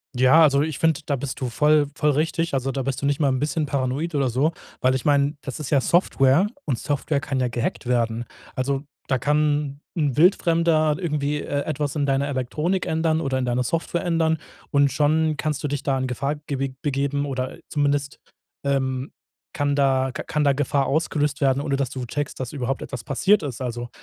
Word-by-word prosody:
Ja, 130 Hz, +6 st, +6 dB
also 140 Hz, -2 st, +4 dB
ich 155 Hz, -1 st, -2 dB
finde, 160 Hz, -2 st, +2 dB
da 145 Hz, -, 0 dB
bist 130 Hz, -1 st, -5 dB
du 130 Hz, -, -1 dB
voll 150 Hz, +3 st, +3 dB
voll 150 Hz, -1 st, +2 dB
richtig. 165 Hz, +3 st, 0 dB
Also 135 Hz, 0 st, 0 dB
da 135 Hz, -1 st, -2 dB
bist 135 Hz, 0 st, -3 dB
du 140 Hz, -, -1 dB
nicht 145 Hz, +1 st, +1 dB
mal 145 Hz, -, +3 dB
'n 130 Hz, -1 st, 0 dB
bisschen 150 Hz, +2 st, 0 dB
paranoid 140 Hz, +4 st, -2 dB
oder 135 Hz, -3 st, +2 dB
so, 140 Hz, +7 st, +1 dB, 0.3 s
weil 130 Hz, +1 st, +3 dB
ich 130 Hz, -, -3 dB
meine, 145 Hz, 0 st, +3 dB
das 135 Hz, +2 st, -6 dB
ist 145 Hz, -, -5 dB
ja 140 Hz, -3 st, +3 dB
Software 165 Hz, +1 st, +3 dB, 0.2 s
und 125 Hz, -5 st, -1 dB
Software 145 Hz, 0 st, -1 dB
kann 135 Hz, -1 st, -2 dB
ja 125 Hz, -1 st, +1 dB
gehackt 120 Hz, +1 st, -3 dB
werden. 120 Hz, -1 st, 0 dB, 0.3 s
Also 135 Hz, +2 st, -1 dB, 0.2 s
da 130 Hz, -, +2 dB
kann 150 Hz, +1 st, 0 dB, 0.2 s
'n 145 Hz, -5 st, +1 dB
Wildfremder 165 Hz, -3 st, +3 dB
irgendwie, 150 Hz, -3 st, -1 dB
äh, 145 Hz, 0 st, -2 dB
etwas 150 Hz, -1 st, -2 dB
in 145 Hz, -1 st, +1 dB
deiner 140 Hz, 0 st, +1 dB
Elektronik 150 Hz, +7 st, -1 dB
ändern 160 Hz, 0 st, +1 dB
oder 135 Hz, -1 st, -1 dB
in 130 Hz, -, -1 dB
deiner 125 Hz, +1 st, 0 dB
Software 165 Hz, +6 st, -2 dB
ändern 165 Hz, -2 st, +2 dB, 0.3 s
und 140 Hz, -1 st, +4 dB
schon 155 Hz, +2 st, +2 dB
kannst 155 Hz, -2 st, -2 dB
du -, -, 0 dB
dich 145 Hz, 0 st, -3 dB
da 135 Hz, -2 st, +1 dB
in 130 Hz, 0 st, -1 dB
Gefahr 140 Hz, +4 st, -2 dB
ge 135 Hz, -1 st, -2 dB
begeben 140 Hz, -1 st, -1 dB
oder 130 Hz, -2 st, -3 dB
zumindest, 145 Hz, -1 st, 0 dB, 0.4 s
ähm, 135 Hz, -1 st, -1 dB, 0.4 s
kann 145 Hz, -1 st, 0 dB
da 135 Hz, -2 st, +2 dB
k -, -, -5 dB
kann 150 Hz, -1 st, 0 dB
da 140 Hz, -, +4 dB
Gefahr 140 Hz, 0 st, +1 dB
ausgelöst 150 Hz, -1 st, 0 dB
werden, 135 Hz, 0 st, +3 dB
ohne 140 Hz, -2 st, -1 dB
dass 135 Hz, -2 st, -1 dB
du 125 Hz, -1 st, -5 dB
checkst, 145 Hz, +4 st, -4 dB
dass 130 Hz, 0 st, -4 dB
überhaupt 135 Hz, -1 st, -2 dB
etwas 125 Hz, -4 st, -6 dB
passiert 190 Hz, -, +3 dB
ist. 135 Hz, -4 st, -5 dB
Also, 120 Hz, -1 st, -4 dB
140 Hz, 205 wpm, -23 LUFS, 130-150 Hz, 0.4 s, Ja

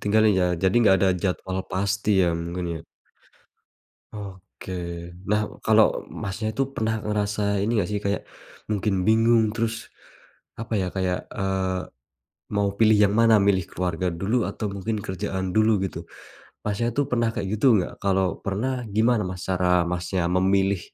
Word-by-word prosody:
tinggalin 110 Hz, +1 st, +3 dB
ya -, -, +3 dB, 0.2 s
jadi 95 Hz, +2 st, +2 dB
gak 95 Hz, -, +6 dB
ada 95 Hz, -, +4 dB
jadwal 95 Hz, 0 st, -2 dB
pasti 100 Hz, +1 st, +1 dB
ya 90 Hz, -, +3 dB
mungkin 85 Hz, +1 st, -4 dB
ya. -, -, -7 dB, 1.3 s
Oke. 95 Hz, -2 st, -9 dB, 0.6 s
Nah, 105 Hz, 0 st, +3 dB, 0.2 s
kalo -, -, +4 dB
Masnya 110 Hz, +3 st, -4 dB
itu 135 Hz, +5 st, 0 dB
pernah 110 Hz, 0 st, -1 dB
ngerasa 105 Hz, -1 st, -1 dB
ini 105 Hz, -, 0 dB
gak 90 Hz, -, -2 dB
sih 105 Hz, -, -1 dB
kayak, 100 Hz, 0 st, 0 dB, 0.5 s
mungkin 105 Hz, -1 st, 0 dB
bingung 110 Hz, 0 st, +4 dB
terus, 115 Hz, 0 st, -2 dB, 0.7 s
apa 115 Hz, 0 st, -4 dB
ya 95 Hz, -, -1 dB
kayak, 90 Hz, -1 st, -1 dB
eee, 95 Hz, -4 st, -1 dB, 0.7 s
mau 100 Hz, -1 st, +2 dB
pilih 110 Hz, -1 st, +5 dB
yang 105 Hz, -1 st, +4 dB
mana 115 Hz, 0 st, +5 dB
milih 95 Hz, -2 st, +2 dB
keluarga 90 Hz, 0 st, -2 dB
dulu 100 Hz, +8 st, 0 dB
atau 110 Hz, -, -4 dB
mungkin 100 Hz, +3 st, -3 dB
kerjaan 95 Hz, -1 st, -3 dB
dulu 110 Hz, +1 st, +4 dB
gitu, 95 Hz, -, -4 dB, 0.7 s
Masnya 105 Hz, +3 st, -1 dB
tuh 145 Hz, -, +2 dB
pernah 115 Hz, -2 st, +2 dB
kayak 100 Hz, -2 st, -3 dB
gitu 115 Hz, -, +1 dB
gak? 90 Hz, -, -6 dB
Kalau 95 Hz, -1 st, +1 dB
pernah 125 Hz, +6 st, -2 dB
gimana 110 Hz, +3 st, +2 dB
Mas 90 Hz, 0 st, -6 dB
cara 90 Hz, -1 st, +2 dB
Masnya 90 Hz, 0 st, -2 dB
memilih, 95 Hz, +1 st, +2 dB
100 Hz, 150 wpm, -24 LUFS, 95-110 Hz, 1.3 s, gak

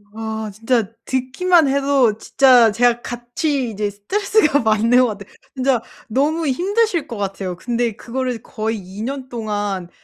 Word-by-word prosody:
아 220 Hz, -1 st, -4 dB
진짜 225 Hz, 0 st, 0 dB
듣기만 280 Hz, +6 st, +2 dB
해도 275 Hz, -5 st, +2 dB
진짜 250 Hz, -4 st, +5 dB
제가 240 Hz, +2 st, +2 dB
같이 245 Hz, +2 st, -2 dB
이제 210 Hz, 0 st, -2 dB
스트레스가 300 Hz, -, +1 dB
받는 225 Hz, +3 st, +3 dB
것 255 Hz, -, +4 dB
같아. 200 Hz, -, -11 dB, 0.3 s
진짜 260 Hz, -3 st, +1 dB, 0.3 s
너무 295 Hz, +8 st, 0 dB
힘드실 360 Hz, -, 0 dB
것 230 Hz, -, -6 dB
같아요. 195 Hz, -2 st, -4 dB
근데 235 Hz, +3 st, -1 dB
그거를 250 Hz, -1 st, -4 dB
거의 220 Hz, -2 st, -3 dB
2 190 Hz, +1 st, -9 dB
년 265 Hz, +2 st, -4 dB
동안 205 Hz, -6 st, -3 dB
240 Hz, 280 characters per minute, -20 LUFS, 215-275 Hz, 0.3 s, 진짜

